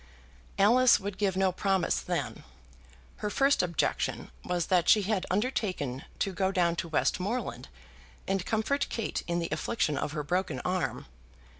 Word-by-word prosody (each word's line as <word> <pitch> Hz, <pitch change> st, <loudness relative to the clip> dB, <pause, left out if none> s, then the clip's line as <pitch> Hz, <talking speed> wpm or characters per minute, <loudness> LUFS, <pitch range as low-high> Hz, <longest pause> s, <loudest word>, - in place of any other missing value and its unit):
Alice 245 Hz, +5 st, +6 dB
would 200 Hz, -1 st, -6 dB
give 195 Hz, -3 st, +1 dB
no 190 Hz, -1 st, +3 dB
promise 190 Hz, -1 st, +1 dB
then. 170 Hz, -7 st, -3 dB, 0.7 s
Her 210 Hz, -, -3 dB
first 275 Hz, +6 st, +3 dB
objection 170 Hz, -2 st, -1 dB
was 175 Hz, -2 st, -1 dB
that 180 Hz, -2 st, +2 dB
she 210 Hz, -, +6 dB
had 195 Hz, -2 st, -1 dB
undertaken 185 Hz, -, -1 dB
to 195 Hz, -, -1 dB
go 190 Hz, +1 st, 0 dB
down 175 Hz, -3 st, +2 dB
to 170 Hz, -, -2 dB
Westmoreland 185 Hz, +8 st, -1 dB, 0.6 s
and 195 Hz, -1 st, 0 dB
comfort 225 Hz, +8 st, 0 dB
Kate 225 Hz, -, -2 dB
in 170 Hz, 0 st, 0 dB
the 170 Hz, -1 st, -2 dB
affliction 150 Hz, -10 st, 0 dB
of 150 Hz, -, -3 dB
her 150 Hz, -2 st, -2 dB
broken 175 Hz, -4 st, -1 dB
arm. 180 Hz, -1 st, -2 dB
190 Hz, 150 wpm, -29 LUFS, 175-210 Hz, 0.7 s, Alice